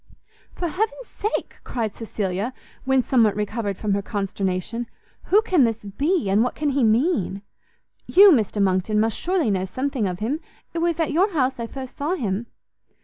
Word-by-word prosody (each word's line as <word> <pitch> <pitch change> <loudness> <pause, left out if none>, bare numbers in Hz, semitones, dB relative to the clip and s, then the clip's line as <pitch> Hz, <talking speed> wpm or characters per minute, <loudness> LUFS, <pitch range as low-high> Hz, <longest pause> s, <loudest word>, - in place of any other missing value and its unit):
"For 350 - -2
heaven's 435 +8 -2
sake," 425 0 -4
cried 225 -4 -3
Cecilia, 210 +1 -3 0.3
when 265 -1 +3
somewhat 230 -6 +3
recovered 210 -1 -2
from 210 -2 -1
her 200 - +1
consternation, 200 +2 -3 0.4
"who 420 +3 +4
can 360 -10 +3
this 225 -2 0
be, 285 - 0
and 200 +3 +3
what 250 - -2
can 300 -1 0
he 275 -1 +1
mean? 220 - +1 0.6
You, 395 +1 +8
Mr 220 - +2
Monckton, 195 +2 +2
must 220 0 +1
surely 350 - 0
know 190 -1 0
something 255 +3 -2
of 180 -1 -3
him; 240 - -2 0.3
it 335 - -2
was 340 0 0
at 325 - +1
your 375 +7 +2
house 265 -4 +1
I 230 - -3
first 260 +1 -8
saw 305 +6 0
him." 220 - -2
235 Hz, 175 wpm, -23 LUFS, 205-305 Hz, 0.6 s, You